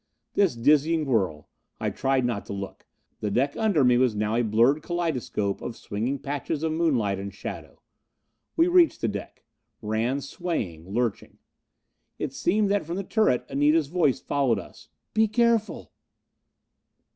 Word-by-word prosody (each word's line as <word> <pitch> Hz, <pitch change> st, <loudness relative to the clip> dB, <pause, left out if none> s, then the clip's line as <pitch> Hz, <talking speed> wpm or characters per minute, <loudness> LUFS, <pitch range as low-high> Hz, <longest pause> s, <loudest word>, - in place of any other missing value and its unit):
This 195 Hz, -10 st, +2 dB
dizzying 150 Hz, +6 st, +3 dB
whirl. 95 Hz, -, 0 dB, 0.3 s
I -, -, -1 dB
tried 135 Hz, -1 st, +1 dB
not 115 Hz, -4 st, -1 dB
to -, -, -5 dB
look. 100 Hz, -1 st, -7 dB, 0.3 s
The 105 Hz, -, -2 dB
deck 135 Hz, +7 st, 0 dB
under 205 Hz, -10 st, +2 dB
me 125 Hz, -1 st, +5 dB
was 125 Hz, -4 st, +2 dB
now 105 Hz, +1 st, -1 dB
a 120 Hz, -, +2 dB
blurred 120 Hz, +7 st, +3 dB
kaleidoscope 145 Hz, -, -2 dB
of 115 Hz, -, -6 dB
swinging 115 Hz, +7 st, -3 dB
patches 145 Hz, +2 st, -3 dB
of 160 Hz, -, 0 dB
moonlight 130 Hz, -, +1 dB
and 100 Hz, 0 st, -5 dB
shadow. 100 Hz, -, -8 dB, 0.7 s
We 330 Hz, +1 st, +5 dB
reached 355 Hz, -2 st, +4 dB
the -, -, +1 dB
deck. 100 Hz, -2 st, -6 dB, 0.3 s
Ran, 110 Hz, +5 st, -1 dB
swaying, 95 Hz, -, -4 dB
lurching. 115 Hz, 0 st, -2 dB, 0.8 s
It -, -, -4 dB
seemed 205 Hz, +2 st, +1 dB
that 205 Hz, -1 st, +1 dB
from 170 Hz, -, -3 dB
the 195 Hz, -, -3 dB
turret 215 Hz, -, +1 dB
Anita's 145 Hz, +1 st, +2 dB
voice 160 Hz, -6 st, +2 dB
followed 135 Hz, -6 st, +1 dB
us. -, -, -11 dB, 0.2 s
"Be 220 Hz, 0 st, +4 dB
careful!" 230 Hz, 0 st, +1 dB
135 Hz, 150 wpm, -26 LUFS, 110-165 Hz, 0.8 s, me